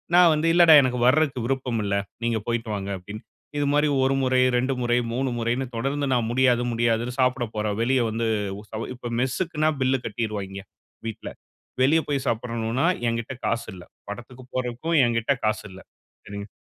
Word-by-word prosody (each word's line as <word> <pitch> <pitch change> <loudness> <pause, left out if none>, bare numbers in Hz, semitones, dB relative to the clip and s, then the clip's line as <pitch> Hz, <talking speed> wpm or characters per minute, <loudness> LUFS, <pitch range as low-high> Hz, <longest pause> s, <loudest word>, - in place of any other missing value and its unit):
நான் 175 -2 +7
வந்து, 155 +2 0
"இல்லைடா 170 -2 +7
எனக்கு 125 -1 -1
வர்றதுக்கு 135 -3 +2
விருப்பம் 125 -3 -1
இல்ல. 100 0 0 0.3
நீங்க 115 -1 +1
போய்ட்டு 115 -1 -2
வாங்க" 100 0 -4
அப்படின்னு. 105 +4 -9 0.4
இது 145 - +1
மாரி 150 +1 +3 0.2
1 135 +1 +2
முறை, 130 0 +2
2 130 +2 +1
முறை, 120 0 +2 0.2
3 130 +2 0
முறைன்னு 120 +3 -1
தொடர்ந்து 140 +4 -1
நான் 120 -3 +1
முடியாது, 125 -1 +3
முடியாதுன்னு 120 +1 0
சாப்பிட 125 -1 +2
போறேன், 105 -1 -1
வெளிய 130 +1 +2
வந்து 115 +1 -1 0.3
உ - - -9
சவ 110 +1 -4
இப்ப 120 -1 -7
மெஸ்ஸுக்குன்னா 155 +3 0
பில்ல 130 +1 +3
கட்டிருவாய்ங்க, 100 -3 -4 0.4
வீட்ல. 110 - -6 0.5
வெளிய 150 +5 +5
போய் 140 -3 -1
சாப்பிடணும்னா 115 +3 -1 0.2
என்கிட்ட 115 +2 -2
காசு 115 0 -1
இல்லை. 90 -1 -11 0.2
படத்துக்கு 120 +4 -9
போறதுக்கும் 130 +6 -1
என்கிட்ட 115 +2 0
காசு 110 0 0
இல்லை. 95 - -12 0.4
சரிங் 100 0 -7
120 Hz, 165 wpm, -24 LUFS, 115-135 Hz, 0.5 s, நான்